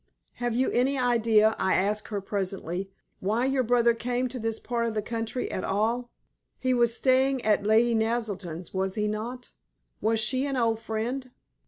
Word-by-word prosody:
"Have 240 -1 0
you 260 +2 +1
any 265 +3 +2
idea," 225 -3 +3
I 190 - +2
asked 210 +3 0
her 205 -2 -3
presently, 190 -2 -3 0.3
"why 220 +6 0
your 270 0 +2
brother 235 -1 +3
came 245 +2 -1
to 250 +1 -6
this 225 0 -2
part 235 -1 -1
of 225 - -3
the 215 - +1
country 230 +2 -3
at 185 - -3
all. 230 +5 0 0.5
He 255 0 0
was 240 -1 +3
staying 260 -1 +2
at 210 -1 +2
Lady 230 +2 +4
Naselton's, 205 -7 -2
was 190 0 -1
he 210 -1 0
not? 235 +4 -5 0.5
Was 220 +1 +2
she 260 +4 +1
an 275 -1 -2
old 225 -2 +1
friend?" 230 +4 -3
230 Hz, 175 wpm, -27 LUFS, 210-245 Hz, 0.5 s, Lady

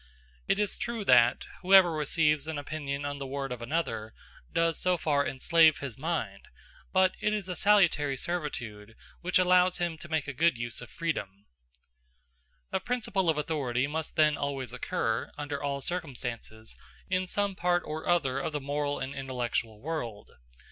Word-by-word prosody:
It - - +2
is 210 -1 -1
true 230 -3 -3
that 120 -4 +5 0.2
whoever 185 -1 +7
receives 150 -1 +1
an 160 -2 -3
opinion 145 -1 -4
on 145 0 -4
the 135 - -5
word 135 0 -4
of 125 -1 -5
another, 115 -5 -2 0.4
does 165 -1 +1
so 180 -1 +2
far 145 -3 +1
enslave 160 +3 +4
his 135 -5 -5
mind; 165 +6 -3 0.4
but 185 -1 +4
it 210 - +1
is 205 -3 -2
a 180 - -3
salutary 170 -10 +3
servitude 120 -10 -4 0.3
which 180 +1 +2
allows 180 0 +4
him 170 -2 -2
to 170 - -10
make 160 -3 -1
a 140 - -4
good 160 0 +2
use 120 0 -4
of 125 - -10
freedom. 100 - -4 1.3
A - - +1
principle 200 -5 -1
of 160 - +2
authority 140 -5 0
must 155 +2 -4
then 155 -2 +4
always 135 -4 -3
occur, 115 -2 -2
under 145 -1 -4
all 140 -1 -2
circumstances, 120 -9 -5 0.3
in 185 0 0
some 200 +1 -1
part 175 -1 +1
or 155 +2 -4
other 140 -7 +2
of 150 +3 -3
the 150 - -1
moral 145 +1 -2
and 135 +1 -4
intellectual 125 -5 -3
world. 120 -8 -5
150 Hz, 165 wpm, -29 LUFS, 130-175 Hz, 1.3 s, whoever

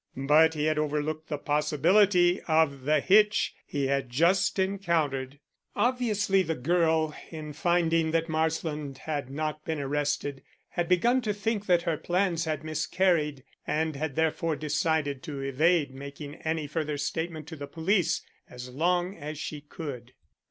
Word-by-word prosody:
But 155 +4 +4
he 150 0 0
had 155 -1 +1
overlooked 150 +1 -2
the 150 - -2
possibility 175 +6 +3
of 155 -5 +2
the 150 0 +3
hitch 210 +4 +4
he 140 -2 -1
had 135 -1 0
just 170 +13 +2
encountered. 165 -9 0 0.4
Obviously 215 -6 +2
the 160 -3 -2
girl, 160 +2 +1
in 155 -2 -7
finding 165 -1 +2
that 165 0 0
Marsland 155 -3 -2
had 145 -3 -4
not 155 +2 -3
been 160 -1 -3
arrested, 145 0 -2 0.3
had 175 -1 -2
begun 235 +8 +3
to 215 -3 -1
think 210 0 -2
that 175 -2 +3
her 165 -3 0
plans 175 -1 0
had 155 -2 -2
miscarried 155 -2 0 0.2
and 155 0 0
had 145 0 -3
therefore 160 0 0
decided 150 -1 -1
to 145 -3 -6
evade 145 +2 +2
making 140 +2 -8
any 160 -1 -2
further 150 0 -2
statement 160 +2 -3
to 160 - -7
the 145 -2 -7
police 170 +1 +1 0.3
as 125 0 -9
long 175 +6 0
as 150 -1 -7
she 150 0 -5
could. 140 -5 -8
155 Hz, 150 wpm, -28 LUFS, 145-175 Hz, 0.4 s, But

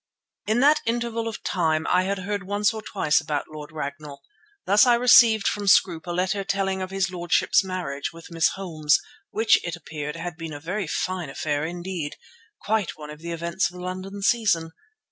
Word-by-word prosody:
In 220 +3 +2
that 300 +2 +5
interval 230 -1 -1
of 225 - -6
time 160 -3 0
I 180 +1 +3
had 200 +1 -1
heard 200 +2 -3
once 205 +3 0
or 220 - -5
twice 155 -7 +1
about 150 -2 -2
Lord 150 -1 -9
Ragnall. 145 -1 -7 0.4
Thus 205 +5 +5
I 240 - +6
received 235 -3 +6
from 205 -1 -1
Scroope 175 -3 +4
a - - -2
letter 185 +3 0
telling 195 -1 -1
of 185 - -4
his 195 0 -1
lordship's 175 +2 +2
marriage 180 -7 -4
with 165 0 -13
Miss 165 0 +3
Holmes, 160 -6 +1 0.3
which, 220 0 +3
it 170 0 -3
appeared, 150 -2 -6
had 165 0 -6
been 165 -2 -6
a 145 - -7
very 185 +4 -3
fine 180 0 -2
affair 145 +1 -2
indeed, 175 -2 -5 0.4
quite 210 -6 -1
one 150 -1 -9
of 150 - -11
the 170 +1 -7
events 170 +3 -1
of 175 - -16
the 180 - -8
London 190 +2 -6
season. 195 -8 +2
180 Hz, 190 wpm, -24 LUFS, 160-200 Hz, 0.4 s, I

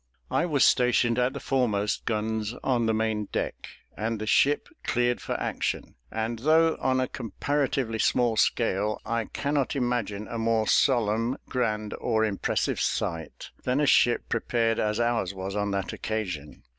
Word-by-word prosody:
I 175 - +2
was 145 -5 +3
stationed 125 -1 +3
at 125 +1 +1
the 140 - -5
foremost 110 -7 0
guns 110 0 -1
on 120 -3 +1
the - - +3
main 110 -1 0
deck, - - -4 0.3
and 115 +1 -2
the 110 - -3
ship 140 +6 +3 0.2
cleared 120 0 +1
for - - -3
action; - - -2 0.2
and 110 +1 -2
though 160 +4 +4
on 130 0 +2
a 130 - +1
comparatively 130 0 -2
small 120 +1 +2
scale, 105 -1 +1
I 115 -1 -1
cannot 140 +2 -1
imagine 120 -5 -1
a 115 - -4
more 115 -1 +1
solemn, 115 -1 +2
grand, 110 -4 -1
or 110 -2 +2
impressive 100 -3 -1
sight, 80 -2 -3
than 125 +2 0
a 150 - +3
ship 120 -3 +4
prepared 115 -2 0
as 105 +1 0
ours 115 -5 0
was 95 +1 -5
on 105 0 0
that 100 -2 -2
occasion. 90 -10 -4
115 Hz, 155 wpm, -27 LUFS, 105-125 Hz, 0.3 s, though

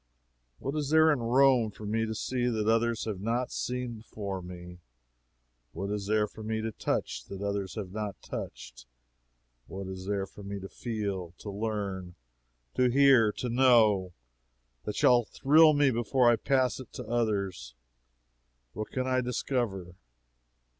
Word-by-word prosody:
What 135 +3 -4
is 150 -2 -1
there 160 +1 +6
in 145 - +1
Rome 125 0 +4
for 105 +1 -10
me 110 +2 0
to 110 - -4
see 125 +3 -1
that 110 -3 -1
others 115 0 +1
have 105 -4 -4
not 120 +4 -1
seen 125 -1 -3
before 100 -3 -6
me? 90 0 -10 0.9
What 100 +1 -4
is 105 -1 -3
there 105 0 +2
for 110 - -12
me 110 0 -2
to 110 0 -3
touch - - -3
that 100 0 -7
others 100 -2 -2
have 100 -5 -5
not 105 -1 -4
touched? - - -8 0.8
What 95 0 -6
is 95 0 -7
there 100 -1 -1
for 100 - -14
me 100 0 -5
to 95 - -7
feel, 100 -7 -4
to 105 - -7
learn, 100 -4 -4 0.6
to 125 -1 +3
hear, 130 -4 +5
to 125 - -4
know, 115 -7 +4 0.7
that 105 - -3
shall 120 -1 +5
thrill 155 +6 +5
me 145 -2 +4
before 120 +1 +3
it 115 - -3
pass 130 -2 +2
to 125 - -7
others? 100 - -2 1.0
What 110 - -5
can 130 -1 -2
I 130 0 +1
discover? 120 -7 -2
110 Hz, 155 wpm, -29 LUFS, 100-125 Hz, 1.0 s, there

